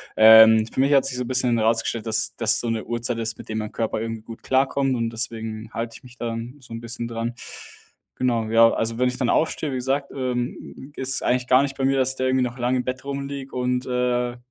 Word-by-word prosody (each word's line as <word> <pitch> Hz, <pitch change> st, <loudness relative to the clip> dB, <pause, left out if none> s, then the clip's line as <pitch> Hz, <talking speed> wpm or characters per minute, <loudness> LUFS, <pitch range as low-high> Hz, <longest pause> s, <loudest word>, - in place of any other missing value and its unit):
ähm 110 Hz, 0 st, +8 dB
für 115 Hz, -, -7 dB
mich 140 Hz, +2 st, +3 dB
hat 135 Hz, -, +5 dB
sich 130 Hz, -2 st, -1 dB
so 125 Hz, -, -1 dB
'n -, -, -7 dB
bisschen 125 Hz, -2 st, +1 dB
herausgestellt, 115 Hz, 0 st, 0 dB
das 110 Hz, 0 st, +1 dB
das 115 Hz, -2 st, +2 dB
so 120 Hz, -, -3 dB
'ne 115 Hz, -1 st, -2 dB
Uhrzeit 120 Hz, 0 st, -2 dB
ist, 110 Hz, 0 st, -3 dB
mit -, -, -12 dB
dem 110 Hz, -, -3 dB
mein 105 Hz, -1 st, -4 dB
Körper 110 Hz, -1 st, -2 dB
irgendwie 115 Hz, -1 st, -4 dB
gut 115 Hz, 0 st, -11 dB
klarkommt 135 Hz, 0 st, +1 dB
und 115 Hz, -1 st, -1 dB
deswegen 110 Hz, -1 st, -5 dB
halte 115 Hz, -1 st, -4 dB
ich -, -, -22 dB
mich 125 Hz, 0 st, -15 dB
dann 115 Hz, +2 st, -5 dB
so 120 Hz, -2 st, -12 dB
'n 115 Hz, -, -5 dB
bisschen 120 Hz, 0 st, -6 dB
dran. 115 Hz, +1 st, -3 dB, 0.8 s
Genau, 120 Hz, -3 st, 0 dB
ja 115 Hz, 0 st, +6 dB
also 115 Hz, +1 st, -2 dB
wenn 125 Hz, 0 st, +2 dB
ich 125 Hz, -, -5 dB
dann 125 Hz, -, 0 dB
aufstehe, 155 Hz, -2 st, 0 dB
wie -, -, -3 dB
gesagt, 135 Hz, +2 st, -1 dB
ähm, 130 Hz, +2 st, -4 dB
ist 130 Hz, 0 st, +1 dB
eigentlich 125 Hz, 0 st, 0 dB
gar 130 Hz, +1 st, +5 dB
nicht 135 Hz, -1 st, -3 dB
bei 135 Hz, -, -2 dB
mir, 135 Hz, 0 st, +2 dB
dass 130 Hz, 0 st, +1 dB
der 130 Hz, 0 st, -1 dB
irgendwie 130 Hz, -1 st, +2 dB
noch 125 Hz, +1 st, -6 dB
lang 125 Hz, +1 st, 0 dB
im 125 Hz, -, -2 dB
Bett 130 Hz, +1 st, -4 dB
rumliege 140 Hz, -1 st, -6 dB
und, 125 Hz, 0 st, -1 dB
äh- 125 Hz, -1 st, -1 dB
120 Hz, 240 wpm, -23 LUFS, 115-130 Hz, 0.8 s, ähm